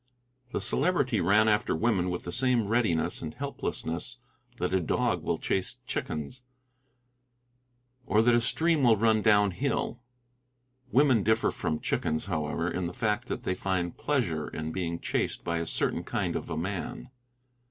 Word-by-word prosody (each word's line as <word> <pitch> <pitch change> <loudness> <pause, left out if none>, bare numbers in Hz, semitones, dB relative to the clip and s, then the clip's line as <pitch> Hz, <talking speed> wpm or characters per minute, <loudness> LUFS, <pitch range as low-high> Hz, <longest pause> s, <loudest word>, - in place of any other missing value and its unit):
The - - -1
Celebrity 130 - +1
ran 105 +5 +4
after 105 -5 +2
women 95 -2 +1
with 90 0 -3
the 90 - -5
same 120 -1 +2
readiness 105 -8 +1
and 80 -1 -6
helplessness 125 - -4 0.4
that 90 -2 -1
a 95 - +4
dog 85 - 0
will - - -1
chase 95 - -1
chickens, 75 - -4 1.7
or 110 -2 +4
that 120 +1 +5
a 120 - +4
stream 160 +5 +2
will 120 -4 +5
run 110 0 +3
down 105 -1 +4
hill. 125 +2 -2 0.9
Women 130 -4 +4
differ 110 +2 +2
from 75 - -2
chickens, 80 0 -1
however, 80 -2 -2
in 90 0 -2
the 90 - -7
fact 105 -3 0
that - - -4
they 95 - 0
find 90 -2 -2
pleasure 95 - -1
in 80 0 -5
being 85 -1 -3
chased - - -2
by 85 -1 -1
a 85 - -3
certain - - 0
kind - - -2
of - - -4
a 80 - -3
man. 95 +7 -4
100 Hz, 160 wpm, -29 LUFS, 85-120 Hz, 1.7 s, that